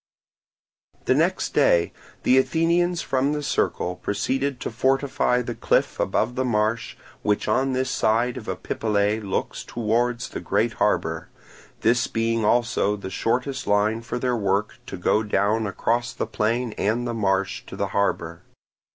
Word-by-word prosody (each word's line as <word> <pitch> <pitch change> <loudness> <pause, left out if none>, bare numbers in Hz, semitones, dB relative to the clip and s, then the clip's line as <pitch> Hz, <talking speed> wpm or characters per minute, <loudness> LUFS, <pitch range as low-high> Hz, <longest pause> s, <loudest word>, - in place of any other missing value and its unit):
The - - +4
next - - +1
day 85 0 +3 0.3
the 130 - +5
Athenians 170 +4 +1
from 135 +2 +1
the 150 0 -3
Circle 90 -9 -1
proceeded 130 +6 -1
to - - -3
fortify 130 0 +1
the 120 - -4
cliff - - 0
above 125 - 0
the 130 +1 -1
marsh 110 -2 0 0.2
which 105 0 0
on 130 +5 +1
this 130 0 0
side 120 +3 +1
of 120 -4 -8
Epipolae 105 +3 0
looks 100 -3 -3
towards 120 +2 -1
the - - -5
great - - 0
harbour; - - 0 0.5
this 120 +2 +3
being 115 0 0
also 110 -2 +2
the 100 -2 -7
shortest 130 +6 -1
line 105 +2 +2
for 115 - -4
their 125 0 0
work 100 -1 0
to 95 - -6
go 95 +4 +2
down 105 +1 +1
across 120 +4 -1
the - - -2
plain 115 +2 -1
and 115 +5 0
the 120 - -2
marsh 100 -3 0
to - - -8
the 100 - -2
harbour. 85 -4 -1
115 Hz, 150 wpm, -24 LUFS, 105-125 Hz, 0.5 s, the